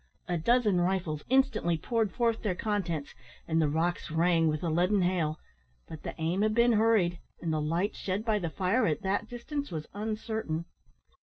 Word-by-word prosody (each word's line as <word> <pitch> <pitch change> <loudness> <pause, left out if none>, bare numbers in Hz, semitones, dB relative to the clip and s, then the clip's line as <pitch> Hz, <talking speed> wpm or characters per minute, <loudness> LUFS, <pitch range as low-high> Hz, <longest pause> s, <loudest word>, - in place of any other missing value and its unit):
A 175 - 0
dozen 210 +1 +3
rifles 175 -5 -1
instantly 260 -10 +2
poured 225 +2 0
forth 230 -2 0
their 195 -5 -1
contents, 175 -8 -2 0.3
and 160 0 +2
the 155 - +2
rocks 165 +4 -1
rang 165 +1 +3
with 155 -1 0
the 170 - -1
leaden 180 +4 +2
hail; 170 -4 0 0.5
but 160 -2 -9
the - - -6
aim 165 +5 0
had 215 0 +2
been 235 +1 +5
hurried, 210 -6 +3 0.2
and 165 -2 -2
the 155 - 0
light 170 +7 0
shed 195 +3 -3
by 215 -2 +2
the 170 -4 -2
fire 200 +8 +1
at 155 +4 -1
that 200 +3 -1
distance 285 +4 -4
was 155 -2 -5
uncertain. 215 -5 -3
185 Hz, 180 wpm, -29 LUFS, 165-220 Hz, 0.5 s, been